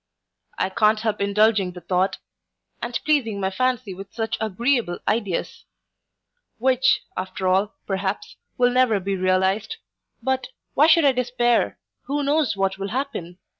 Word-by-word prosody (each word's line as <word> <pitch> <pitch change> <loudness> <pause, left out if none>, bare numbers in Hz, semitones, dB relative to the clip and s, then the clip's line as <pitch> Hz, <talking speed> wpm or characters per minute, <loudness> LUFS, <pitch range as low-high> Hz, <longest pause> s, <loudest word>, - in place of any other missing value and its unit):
I - - 0
can't 215 +2 +3
help 215 -2 -1
indulging 200 -2 +2
the 180 - -10
thought, 185 +2 0 0.6
and 240 0 -2
pleasing 255 -9 +1
my 190 -1 -1
fancy 250 -2 -1
with 195 +2 -10
such 225 -1 -2
agreeable 220 -2 0
ideas; 210 -5 -2 0.9
which 260 +2 +3
after 185 0 -3
all, 195 +3 +2
perhaps, 195 0 -3 0.2
will 245 0 +4
never 250 -4 +3
be 195 +1 -2
realized 190 +3 +1 0.5
But, 260 0 0 0.3
why 300 +3 +5
should 330 -1 +5
I 275 - +6
despair? 240 - +1 0.3
who 285 +2 -1
knows 285 -6 +1
what 195 0 0
will 195 +1 -3
happen? 215 -9 -4
215 Hz, 140 wpm, -23 LUFS, 190-250 Hz, 0.9 s, I